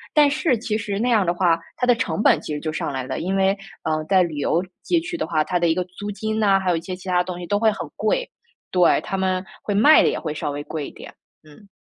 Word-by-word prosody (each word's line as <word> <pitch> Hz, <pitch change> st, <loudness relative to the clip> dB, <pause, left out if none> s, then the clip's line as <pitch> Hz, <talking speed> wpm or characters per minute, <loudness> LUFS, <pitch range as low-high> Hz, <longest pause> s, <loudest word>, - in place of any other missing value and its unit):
但 295 Hz, -1 st, +6 dB
是 285 Hz, -2 st, +1 dB
其 215 Hz, -1 st, -2 dB
实 205 Hz, -2 st, -3 dB
那 245 Hz, +3 st, +1 dB
样 220 Hz, -4 st, +4 dB
的 170 Hz, -, +2 dB
话， 175 Hz, -2 st, +2 dB, 0.2 s
它 250 Hz, -, 0 dB
的 245 Hz, -, +6 dB
成 220 Hz, -, -2 dB
本 -, -, +4 dB
其 150 Hz, -, -5 dB
实 -, -, -3 dB
就 155 Hz, +1 st, -4 dB
上 -, -, -3 dB
来 130 Hz, -1 st, -3 dB
了， 130 Hz, +1 st, -4 dB
因 190 Hz, +3 st, -2 dB
为， 195 Hz, 0 st, +3 dB, 0.3 s
呃， 155 Hz, 0 st, -1 dB
在 190 Hz, -1 st, +5 dB
旅 165 Hz, -3 st, -4 dB
游 165 Hz, +4 st, +1 dB, 0.2 s
街 345 Hz, -, +2 dB
区 340 Hz, +1 st, -5 dB
的 -, -, -2 dB
话， 155 Hz, -2 st, +1 dB
它 180 Hz, -, 0 dB
的 170 Hz, -1 st, +2 dB
一 -, -, +3 dB
个 180 Hz, -, 0 dB
租 200 Hz, +3 st, -7 dB
金 220 Hz, +2 st, -3 dB
呐， 200 Hz, -3 st, +4 dB
还 190 Hz, -1 st, 0 dB
有 -, -, +2 dB
一 -, -, -4 dB
些 185 Hz, -, -6 dB
其 185 Hz, +1 st, -13 dB
它 180 Hz, -, +2 dB
的 -, -, +2 dB
东 180 Hz, -1 st, -6 dB
西 175 Hz, -, -6 dB
都 205 Hz, -, +1 dB
会 220 Hz, 0 st, +4 dB
很 -, -, -6 dB
贵。 -, -, 0 dB, 0.4 s
对， 180 Hz, -2 st, +4 dB
它 -, -, -4 dB
们 185 Hz, 0 st, -1 dB, 0.2 s
会 205 Hz, -, -2 dB
卖 290 Hz, +10 st, +7 dB
得 -, -, +3 dB
也 -, -, -2 dB
会 155 Hz, -3 st, -4 dB
稍 150 Hz, -, -3 dB
微 145 Hz, 0 st, -4 dB
贵 150 Hz, -1 st, -5 dB
一 -, -, -10 dB
点。 -, -, -12 dB, 0.3 s
嗯。 155 Hz, +7 st, -17 dB
190 Hz, 315 characters per minute, -22 LUFS, 165-215 Hz, 0.4 s, 卖